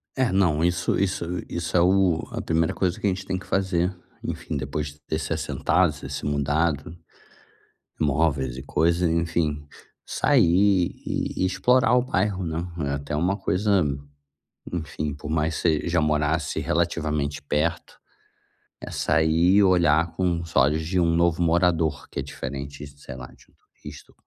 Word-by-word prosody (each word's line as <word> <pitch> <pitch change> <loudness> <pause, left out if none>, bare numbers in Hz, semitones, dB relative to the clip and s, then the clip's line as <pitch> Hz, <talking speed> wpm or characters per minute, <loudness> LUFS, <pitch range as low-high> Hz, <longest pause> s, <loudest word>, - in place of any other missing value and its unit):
É, 130 -2 +2
não, 90 -5 +2
isso 85 0 +1
isso 95 -3 0 0.2
isso 85 +1 -2
é - - +5
o 90 -2 +3
a - - -4
primeira 80 0 +1
coisa 90 -2 -1
que - - 0
a - - +4
gente 95 0 -3
tem 95 -1 -2
que - - -13
fazer, 95 -1 0 0.3
enfim, - - -4
depois 70 +2 -3
de 75 0 -11
ter 80 - -1
se 80 - -5
assentado, 80 +2 +1
você 70 -2 -9
se 70 - -5
mudado, 75 +1 0 1.1
móveis 70 -4 +1
e 65 - -7
coisas, 85 +5 +1
enfim, 80 -3 -1 0.4
sair 90 +1 +3
e - - -2
explorar 125 +7 +3
o 125 - +4
bairro, 100 -5 -1
né? 80 -1 -3 0.3
É - - -1
até 70 +1 -4
uma 90 +6 +1
coisa, 100 0 +1 0.9
enfim, 75 -3 -3
por 75 0 -8
mais 80 0 0
você 80 -1 +1
já 85 0 +2
morasse 75 0 0
relativamente 75 -3 -1
perto, 75 +4 -2 0.8
é - - -7
sair 80 +3 +2
e 105 - +6
olhar 85 -3 +3
com 85 -2 0
olhos 75 +2 +3
de 90 +3 0
um 85 -1 +2
novo 85 0 +2
morador, 85 -2 +1
que - - -5
é - - 0
diferente, 70 +1 -6
sei 70 -2 -11
lá, 65 -1 -8
de - - -20
um - - -30 0.3
turista. - - -11
80 Hz, 160 wpm, -24 LUFS, 75-90 Hz, 1.1 s, e